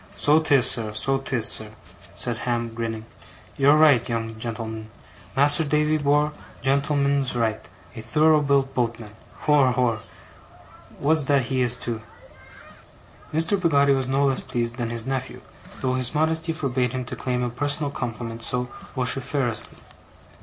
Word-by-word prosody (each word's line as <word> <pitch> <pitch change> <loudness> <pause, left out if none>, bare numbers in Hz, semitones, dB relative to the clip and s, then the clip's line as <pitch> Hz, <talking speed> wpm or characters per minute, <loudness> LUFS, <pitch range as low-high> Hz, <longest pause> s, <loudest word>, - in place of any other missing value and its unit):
'So 150 +2 +4
'tis, 140 -6 +4
sir, 110 -4 +1
so 135 +5 0
'tis, 125 -4 -1
sir,' 110 -3 -4 0.4
said 120 - -1
Ham, 120 -1 -2
grinning. 115 -1 -4 0.5
'You're 140 +2 +5
right, 145 -7 +5
young 115 -1 -2
gen'l'm'n! 110 -1 -5 0.5
Mas'r 145 +4 +5
Davy 150 +1 +1
bor', 145 +1 +2 0.3
gen'l'm'n's 140 -1 +1
right. 110 -2 -1 0.3
A 115 - -6
thorough 155 +6 +3
built 140 -1 +1
boatman! 115 -3 -2 0.3
Hor, 145 -4 +4
hor! 125 -3 +1 1.0
That's 150 -1 +2
what 140 -1 +4
he 130 +1 -1
is, 120 -1 +2
too!' 120 -2 -5 1.3
Mr. 165 +5 +1
Peggotty 140 -5 +4
was 135 -2 -1
no 135 +2 +2
less 135 -1 +2
pleased 115 0 -3
than 120 -2 -2
his 115 -1 -3
nephew, 130 -1 -4 0.4
though 130 -1 0
his 130 +2 +1
modesty 160 +1 +1
forbade 130 -6 -1
him 130 -1 -3
to - - -5
claim 125 -1 -2
a 120 - -2
personal 145 +3 -1
compliment 115 -3 -5
so 125 +1 -2 0.2
vociferously. 130 -2 -1
130 Hz, 145 wpm, -24 LUFS, 120-145 Hz, 1.3 s, You're